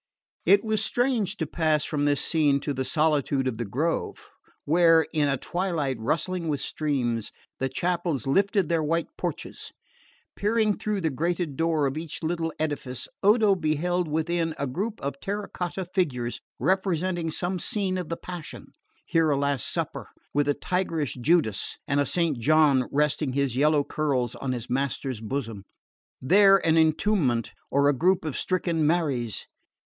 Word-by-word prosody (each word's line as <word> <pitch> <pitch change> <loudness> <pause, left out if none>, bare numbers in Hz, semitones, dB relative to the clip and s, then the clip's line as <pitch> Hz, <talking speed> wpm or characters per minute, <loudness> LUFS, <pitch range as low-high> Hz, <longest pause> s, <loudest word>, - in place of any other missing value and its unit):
It 200 +3 +6
was 215 -1 +2
strange 230 -5 +1
to 160 - -1
pass 155 -1 +1
from 145 -2 -1
this 145 -2 +1
scene 150 -4 +2
to 145 - -2
the 130 0 -2
solitude 145 -1 +1
of 120 -3 -3
the 120 - -2
grove, 150 +11 -2 0.3
where, 165 +1 +5
in 150 -2 +2
a 140 -1 +1
twilight 165 -7 -2
rustling 165 +8 -1
with 145 -3 -1
streams, 125 -9 -2 0.3
the 135 - 0
chapels 170 -3 -1
lifted 195 +5 +2
their 165 0 +1
white 165 +2 0
porches. - - -5 0.6
Peering 215 0 +1
through 210 -2 -2
the 160 -2 0
grated 165 +1 -1
door 160 -1 +1
of 135 +3 -1
each 165 0 -6
little 165 0 -1
edifice, 145 -5 -3
Odo 210 0 +5
beheld 175 +1 0
within 160 +1 -1
a 140 - -1
group 200 - -3
of 140 0 -4
terra 200 +5 -3
cotta 180 +1 -4
figures 140 -10 -2 0.2
representing 185 -3 0
some 180 +3 -2
scene 195 0 -1
of 180 - -5
the 170 - -3
Passion 175 -3 -9 0.3
here 165 -1 +2
a 145 - +2
Last 140 -3 0
Supper, - - -3 0.3
with 145 0 +2
a 145 - +2
tigerish 165 -6 -1
Judas 120 - +1
and 145 -1 +1
a 145 - +1
Saint 165 -7 0
John 145 -1 +4
resting 150 -1 +1
his 140 -3 0
yellow 150 +2 +3
curls 135 -6 -1
on 135 - -4
his 120 -2 -4
Master's 130 -2 -2
bosom, 115 -3 -4 0.6
there 195 +7 +6
an 160 0 +4
Entombment 160 - +2 0.2
or 140 +1 +3
a 145 - +4
group 175 +6 +2
of 155 - -3
stricken 170 -4 0
Maries. 140 -9 0
155 Hz, 160 wpm, -26 LUFS, 140-175 Hz, 0.6 s, It